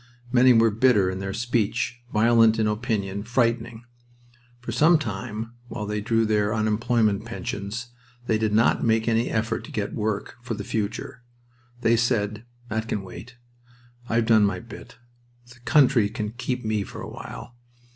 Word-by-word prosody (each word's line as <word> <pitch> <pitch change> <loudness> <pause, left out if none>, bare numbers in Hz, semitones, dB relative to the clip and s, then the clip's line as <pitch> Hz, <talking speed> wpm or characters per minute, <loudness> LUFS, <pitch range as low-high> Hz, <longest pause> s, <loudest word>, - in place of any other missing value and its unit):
Many 130 0 +6
were 115 -2 +5
bitter 105 -4 +3
in 95 - -5
their 95 0 -4
speech, 115 +1 -1
violent 115 0 +4
in 110 - +1
opinion, 105 -3 -2
frightening. 115 0 -1 0.7
For 120 - -6
some 165 +3 +5
time, 110 -3 -5
while 115 -3 -5
they 105 0 -3
drew 115 +1 +1
their 105 0 +1
unemployment 110 -1 +1
pensions, 115 0 -5 0.4
they 110 -2 +1
did 110 -1 0
not 110 +3 +3
make 110 0 +2
any 115 +1 +1
effort 115 0 -1
to - - -12
get 100 -2 -3
work 105 0 -3
for 120 -1 -4
the 105 - -6
future. 110 +4 -4 0.6
They 115 0 +4
said: 110 -2 0 0.2
"That 110 0 -3
can 105 -3 -2
wait. 120 +6 -10 0.7
I've 115 0 +2
done 110 -2 +5
my 100 - +1
bit. - - -12 0.6
The 125 - -20
country 130 -6 +4
can 105 -1 -4
keep 125 +1 -4
me 110 -1 0
for - - -8
a - - -6
while. 120 - -9
115 Hz, 160 wpm, -24 LUFS, 105-120 Hz, 0.7 s, Many